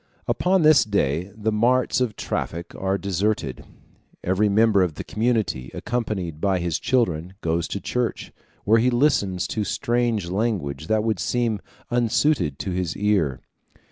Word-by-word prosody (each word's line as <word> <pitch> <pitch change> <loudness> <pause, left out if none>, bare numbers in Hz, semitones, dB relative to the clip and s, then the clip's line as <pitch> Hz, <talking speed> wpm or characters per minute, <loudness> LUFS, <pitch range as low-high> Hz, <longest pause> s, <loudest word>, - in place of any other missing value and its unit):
Upon 185 -1 +2
this 155 -1 +7
day 90 -3 0
the 110 0 -1
marts 125 +4 +2
of 120 -4 0
traffic 85 +1 -4
are 95 0 -1
deserted; 100 -7 -2 0.6
every 95 +4 +2
member 105 -1 +4
of 90 -5 0
the - - -5
community, 110 - -1
accompanied 95 -10 -3
by 95 -2 +2
his 85 -2 -1
children, 95 -8 0
goes 85 +1 0
to 100 - -4
church, 125 +3 -3 0.3
where 110 +3 +5
he 125 +3 +3
listens 120 -8 +2
to 110 - -1
strange 115 -2 0
language 90 -9 -2
which 110 0 +3
would 110 -5 0
seem 115 +2 0 0.3
unsuited 120 - +1
to 95 - -4
his 90 -2 -2
ear. 95 -11 +1
105 Hz, 145 wpm, -23 LUFS, 90-115 Hz, 0.6 s, this